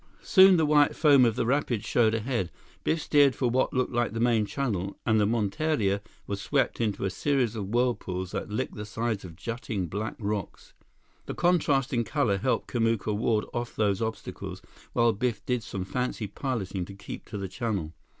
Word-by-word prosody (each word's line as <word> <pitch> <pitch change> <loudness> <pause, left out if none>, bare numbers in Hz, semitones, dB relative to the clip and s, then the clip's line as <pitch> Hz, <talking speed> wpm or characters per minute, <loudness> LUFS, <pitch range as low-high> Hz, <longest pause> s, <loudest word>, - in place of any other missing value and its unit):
Soon 190 -1 +7
the 160 - +3
white 145 -1 +4
foam 140 -5 +6
of 115 -2 +2
the - - 0
rapids 125 -4 0
showed 115 -2 +3
ahead. 115 -5 -1 0.3
Biff 160 -1 0
steered 145 -3 +4
for 125 -3 0
what 130 +2 +2
looked 130 -1 -1
like 120 -2 0
the 115 - -3
main 115 -3 +2
channel, 100 -9 -2
and 110 -1 +3
the 105 - +3
monteria 110 -1 0 0.2
was 100 -1 -4
swept - - 0
into 105 -3 -1
a 95 - -1
series 125 0 0
of 100 -3 -4
whirlpools 100 -6 -1
that - - -4
licked 105 - -2
the 105 - -6
sides 110 -1 -2
of 85 -3 -9
jutting 110 0 -4
black 105 +6 -4
rocks. 105 -2 -4 0.5
The - - -4
contrast 150 -7 +2
in 120 -1 +2
color 115 -7 0
helped 130 +6 0
Kamuka 115 -3 0
ward 110 0 +1
off 120 0 -4
those 100 -2 +1
obstacles, 110 0 -5 0.3
while 115 -1 +3
Biff 110 0 -2
did 125 -2 0
some 95 -3 -5
fancy 125 0 -2
piloting 100 -4 -3
to 100 - -10
keep 100 0 -8
to 105 - -6
the 100 -1 -3
channel. 95 - -3
115 Hz, 190 wpm, -27 LUFS, 100-125 Hz, 0.5 s, Soon